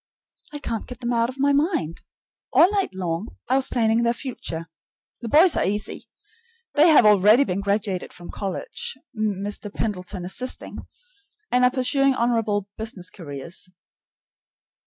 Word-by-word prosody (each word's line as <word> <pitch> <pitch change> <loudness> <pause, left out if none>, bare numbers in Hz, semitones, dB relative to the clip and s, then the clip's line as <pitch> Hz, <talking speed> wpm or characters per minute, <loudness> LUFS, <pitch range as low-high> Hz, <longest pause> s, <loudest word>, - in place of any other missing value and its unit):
I 295 - -5
can't 230 -6 -4
get 250 -1 -9
them 245 -1 -2
out 230 0 +2
of 260 - -8
my 280 +1 +3
mind. 285 - 0 0.5
All 360 - +6
night 400 -2 +1
long 180 +2 -4
I 255 - +2
was 270 -1 +1
planning 225 -1 +2
their 235 0 +1
future. 170 -12 -5 0.6
The 235 - -5
boys 325 - +6
are - - +1
easy. 205 +2 -3 0.7
They 305 +2 +6
have 310 -8 +7
already 210 +5 +6
been 195 -6 -2
graduated 200 -2 -1
from 175 - -10
college, 475 - -5 0.2
Mr. 205 -1 -3
Pendleton 185 -4 -4
assisting, 250 +8 -3 0.7
and 250 0 +3
are 250 - +6
pursuing 270 +1 +2
honorable 225 -4 0
business 220 -5 -4
careers. 165 +1 -8
225 Hz, 145 wpm, -23 LUFS, 195-260 Hz, 0.7 s, have